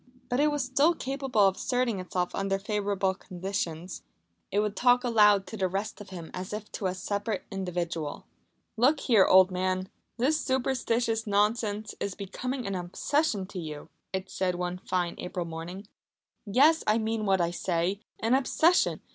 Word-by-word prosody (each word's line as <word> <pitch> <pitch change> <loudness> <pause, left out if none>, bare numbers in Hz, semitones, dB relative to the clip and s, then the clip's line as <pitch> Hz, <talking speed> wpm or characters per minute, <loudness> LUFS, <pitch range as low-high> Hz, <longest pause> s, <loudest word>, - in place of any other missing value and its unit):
But 245 - 0
it 300 +1 +4
was 290 -3 -1
still 280 +7 +3
capable 270 -6 -1
of 190 - 0
asserting 245 -5 0
itself 180 -1 -2
under 195 0 0
favourable 200 -1 0
conditions. 180 -2 -4 0.5
It 200 - +2
would 210 -1 0
talk 245 0 +4
aloud 210 -5 +5
to 220 - -8
the 190 -2 +1
rest 200 +4 -4
of 200 - -10
him 170 -4 -8
as 185 +3 -5
if 210 0 -6
to 195 - -2
a 185 - -2
separate 205 +2 -3
individual. 175 -5 -3 0.5
"Look 275 +6 +4
here, 220 -7 +5
old 185 0 +7
man, 185 +1 -1 0.3
this 300 +6 +2
superstitious 240 -3 0
nonsense 210 +1 +1
is 200 - -3
becoming 250 +6 -4
an 195 - -2
obsession 195 - 0
to 190 - -6
you," 155 -3 -7 0.2
it 190 0 -3
said 185 -1 0
one 180 0 -3
fine 180 -2 -1
April 180 -1 -4
morning. 170 +4 -7 0.6
"Yes, 290 +10 +5
I 215 +1 +4
mean 220 -1 -1
what 190 -1 +3
I 170 -1 +1
say 175 +2 -1 0.2
an 225 +3 +2
obsession! 315 +6 +3
200 Hz, 165 wpm, -28 LUFS, 185-240 Hz, 0.6 s, old